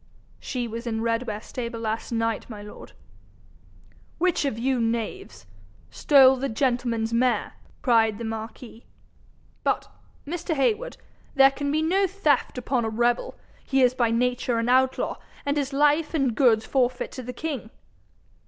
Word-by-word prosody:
'She 245 -2 -3
was 230 +2 -6
in 225 -1 -2
Redware 230 -2 -1
stable 235 -2 -5
last 225 +1 -3
night, 225 -1 -1
my 210 -3 -8
lord.' 210 - -12 1.2
'Which 350 -3 +1
of 270 -6 -1
you, 255 +2 0
knaves, 225 - -3 0.5
stole 265 -2 +6
the 270 +2 -2
gentleman's 235 -2 0
mare?' 245 +1 +1 0.3
cried 225 -4 +3
the 235 - -6
marquis. 225 +1 -7 0.8
'But, - - 0 0.4
Mr. 325 +2 -3
Heywood, 425 - 0 0.4
there 270 0 +7
can 285 +1 -3
be 310 +1 +1
no 380 +4 +2
theft 310 -10 0
upon 250 0 -1
a 225 - -1
rebel. 240 - 0 0.3
He 270 -1 +2
is 250 0 +4
by 240 -2 +1
nature 245 +1 0
an 230 +1 0
outlaw, 260 +1 +2 0.3
and 285 0 0
his 285 -1 -1
life 295 +3 +2
and 270 -6 +1
goods 220 -3 +3
forfeit 255 -2 0
to 255 - -7
the 250 0 -6
king.' 265 -3 -5
250 Hz, 150 wpm, -25 LUFS, 230-275 Hz, 1.2 s, there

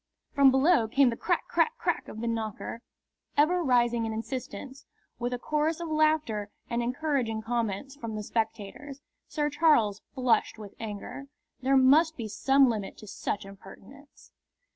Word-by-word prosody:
From 280 -2 +6
below 265 -1 +4
came 260 +2 +4
the - - -3
crack - - -1
crack 465 +1 +1
crack - - -1
of 220 - -8
the 235 - -2
knocker, 225 0 -4 0.6
ever 345 +5 +3
rising 240 -4 +2
in 220 - -3
insistence, 260 +3 -6 0.3
with 245 0 -2
a 250 - -1
chorus 305 +5 -1
of 340 -1 -5
laughter 310 -10 +1 0.2
and 235 0 0
encouraging 245 -3 -1
comments 235 +3 -2
from 230 -5 -5
the 210 - -4
spectators. 225 +6 -4 0.3
Sir 295 -1 -1
Charles 280 -10 +3
flushed 250 -3 +1
with 210 -2 -10
anger. 220 +5 -7 0.3
There 270 +1 +3
must 310 +5 +5
be 230 -3 -4
some 270 +6 +3
limit 215 -5 -3
to - - -11
such 205 -1 -4
impertinence. 200 +8 -15
250 Hz, 155 wpm, -28 LUFS, 220-285 Hz, 0.6 s, From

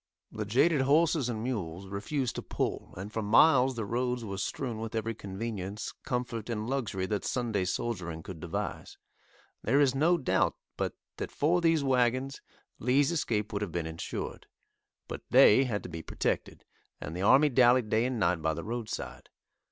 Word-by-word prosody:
The 110 -1 -4
jaded 135 +8 +3
horses 150 -1 +3
and 110 -2 -3
mules 95 -7 -3
refused 120 +7 -2
to - - -2
pull, - - -3
and 100 +3 -7
for 110 - -1
miles 130 +4 +5
the 115 -2 -3
roads 125 +2 -1
were 100 -2 -5
strewn 120 +2 -3
with 115 +1 -5
every 115 0 -1
convenience, 100 0 -5
comfort 120 -3 -3
and 110 -1 -2
luxury 115 -8 -1
that 105 +1 -2
"Sunday 115 -7 -1
soldiering" 90 -5 -3
could 95 -5 -8
devise. 100 +5 -5 0.6
There 135 +6 +2
is 140 -3 +4
no 160 +6 +3
doubt, 140 - +1 0.2
but - - -2 0.2
that - - -4
for 170 +5 +2
these 165 -3 +3
wagons, 130 +1 +1 0.4
Lee's 135 +5 +3
escape 110 -11 -1
would 100 - -2
have 105 -5 -3
been 85 0 -2
insured, 80 0 -5 0.6
but - - -6
they 130 +6 +7
had 110 -5 -2
to - - -7
be 80 -1 -6
protected, - - -3 0.3
and 80 - -6
the 90 - -3
army 135 +9 +6
dallied 125 -3 +4
day 110 +2 +3
and 130 -1 -1
night 85 -3 +2
by 80 0 0
the - - -5
roadside. 110 - -5
115 Hz, 175 wpm, -30 LUFS, 100-130 Hz, 0.6 s, they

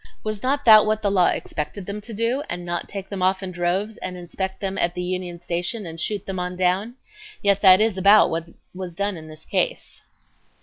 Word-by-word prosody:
Was 215 -1 -3
not 280 +3 0
that 215 -2 +8
what 215 0 0
the 200 - +2
law 185 -3 +4
expected 175 +5 -3
them 205 +2 -5
to 230 - -7
do, 230 +5 0
and 175 0 -4
not 175 -1 -4
take 195 -1 -6
them 195 -2 -5
off 190 +1 +1
in 185 - -5
droves 185 +5 -1
and 180 -1 -6
inspect 190 +2 -5
them 195 -1 -3
at 175 0 +1
the 180 - -3
Union 180 -1 -4
Station 175 +5 -3
and 165 -1 -7
shoot 205 +2 -2
them 190 -1 -4
on 180 0 -3
down? 185 +6 0 0.5
Yet 200 -1 +3
that 190 -1 +8
is 215 -3 +1
about 200 +3 +6
what 165 +1 -3 0.2
was 180 -2 -7
done 200 +1 -1
in 160 -2 -10
this 155 0 -13
case." - - -2
190 Hz, 220 wpm, -23 LUFS, 175-210 Hz, 0.5 s, that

